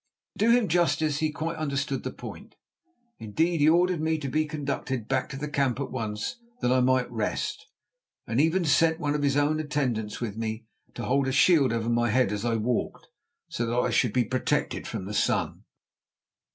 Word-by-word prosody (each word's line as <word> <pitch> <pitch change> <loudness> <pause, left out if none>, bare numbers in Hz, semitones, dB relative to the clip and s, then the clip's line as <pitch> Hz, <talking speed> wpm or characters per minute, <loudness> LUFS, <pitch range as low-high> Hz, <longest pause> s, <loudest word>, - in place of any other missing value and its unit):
To 215 - +3
do - - +6
him 240 -3 +4
justice 155 -3 +1
he 155 -1 0
quite 165 +2 -4
understood 140 -2 -2
the - - -4
point. - - -10 0.6
Indeed, 160 +11 0
he 150 - +6
ordered 175 0 +3
me 160 0 +1
to 140 -3 -4
be 155 +4 0
conducted 140 -5 -3
back 130 -1 0
to 140 - -6
the 150 +2 -4
camp 140 -3 0
at 140 - -4
once 110 - -3 0.2
that 125 - +1
I 130 - +4
might 130 -1 +2
rest, 110 -3 -3 0.6
and 115 +4 +1
even 165 +3 +2
sent 160 +2 +3
one 145 -3 0
of 150 - -1
his 140 -1 +2
own 150 +2 +2
attendants 130 -8 -2
with 110 -4 -4
me 110 0 -4 0.3
to 120 - -5
hold 135 +2 +1
a - - 0
shield 145 -2 +4
over 115 -1 -1
my 120 0 +2
head 130 +3 +2
as 105 0 -3
I 120 -1 +1
walked 115 +2 -2 0.4
so 120 - -3
that 120 +1 -1
I 125 - +1
should 120 - +2
be 125 - +3
protected 130 +3 -1
from 95 - -5
the 105 - -6
sun. - - 0
135 Hz, 200 wpm, -27 LUFS, 120-155 Hz, 0.6 s, do